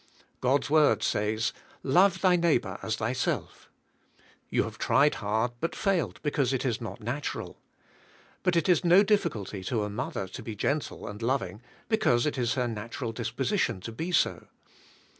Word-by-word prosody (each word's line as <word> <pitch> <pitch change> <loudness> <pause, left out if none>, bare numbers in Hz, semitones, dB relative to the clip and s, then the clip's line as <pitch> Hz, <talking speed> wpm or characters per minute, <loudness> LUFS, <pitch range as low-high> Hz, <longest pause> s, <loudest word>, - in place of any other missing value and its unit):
God's 135 +3 +2
word 150 0 +4
says, 110 +2 0
' - - -26
' - - -39 0.2
Love 190 -1 +4
thy 185 -2 +5
neighbor 150 - +1
as 110 - -1
thyself;" 115 +4 -2 0.8
you - - +2
have - - -7
tried 150 +1 +4
hard 110 +3 0
but 165 - -2
failed 195 -5 0
because 140 -3 +1
it 130 - -1
is 120 -2 -1
not 115 - -6
natural. 130 +6 -4 0.8
But 180 - +1
it 170 - +2
is 180 -2 +4
no 180 +3 +6
difficulty 115 - 0
to 110 -1 0
a 105 - -3
mother 100 -2 -3
to 95 - -8
be 110 - -6
g - - -1
entle 145 +1 -2
and 105 +2 -7
loving 120 -3 -1 0.3
because 170 - +2
it 145 -3 -1
is 120 +1 +1
her 125 -2 0
natural 115 +2 -4
disposition 110 - -1
to 115 - -6
be 160 +11 -4
so. 175 - +1
125 Hz, 175 wpm, -28 LUFS, 110-165 Hz, 0.8 s, no